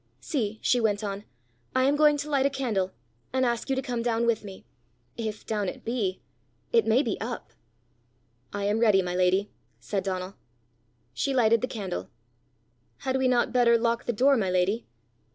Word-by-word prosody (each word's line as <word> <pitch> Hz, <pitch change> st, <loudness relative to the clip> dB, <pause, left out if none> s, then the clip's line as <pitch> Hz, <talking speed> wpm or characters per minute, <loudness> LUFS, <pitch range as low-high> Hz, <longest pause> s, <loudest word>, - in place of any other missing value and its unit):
"See!" 220 Hz, -7 st, -2 dB
she 245 Hz, -, +3 dB
went 210 Hz, -1 st, +1 dB
on, 200 Hz, 0 st, -4 dB, 0.5 s
"I 260 Hz, -, +4 dB
am 275 Hz, +2 st, +3 dB
going 300 Hz, 0 st, +5 dB
to 290 Hz, +1 st, -4 dB
light 275 Hz, -1 st, +3 dB
a -, -, 0 dB
candle, 225 Hz, -9 st, -1 dB, 0.4 s
and 260 Hz, 0 st, +1 dB
ask 235 Hz, +2 st, -1 dB
you 270 Hz, -, +2 dB
to 265 Hz, -, -2 dB
come 245 Hz, -3 st, -2 dB
down 235 Hz, 0 st, +1 dB
with 230 Hz, -2 st, +1 dB
me 195 Hz, -2 st, -10 dB, 0.5 s
if 220 Hz, -2 st, -5 dB
down 210 Hz, -3 st, -1 dB
it -, -, -10 dB
be: 225 Hz, -6 st, -2 dB, 0.5 s
it 460 Hz, -1 st, +4 dB
may 245 Hz, +6 st, +4 dB
be 225 Hz, -6 st, -3 dB
up!" 225 Hz, -, -5 dB, 1.0 s
"I 205 Hz, -, -3 dB
am 205 Hz, +2 st, +1 dB
ready, 210 Hz, -5 st, +4 dB
my 180 Hz, 0 st, -3 dB
lady," 185 Hz, +3 st, +2 dB, 0.3 s
said 195 Hz, -, -2 dB
Donal. 185 Hz, 0 st, -3 dB, 0.8 s
She 275 Hz, -, -1 dB
lighted 230 Hz, -2 st, +4 dB
the 255 Hz, -, 0 dB
candle. 190 Hz, -, -5 dB, 1.0 s
"Had 260 Hz, 0 st, 0 dB
we 260 Hz, -1 st, +2 dB
not 245 Hz, -1 st, +2 dB
better 235 Hz, -2 st, +5 dB
lock 230 Hz, 0 st, 0 dB
the -, -, +1 dB
door, 265 Hz, +5 st, +4 dB
my 195 Hz, -5 st, 0 dB
lady?" 185 Hz, +5 st, +1 dB
230 Hz, 185 wpm, -27 LUFS, 200-255 Hz, 1.0 s, going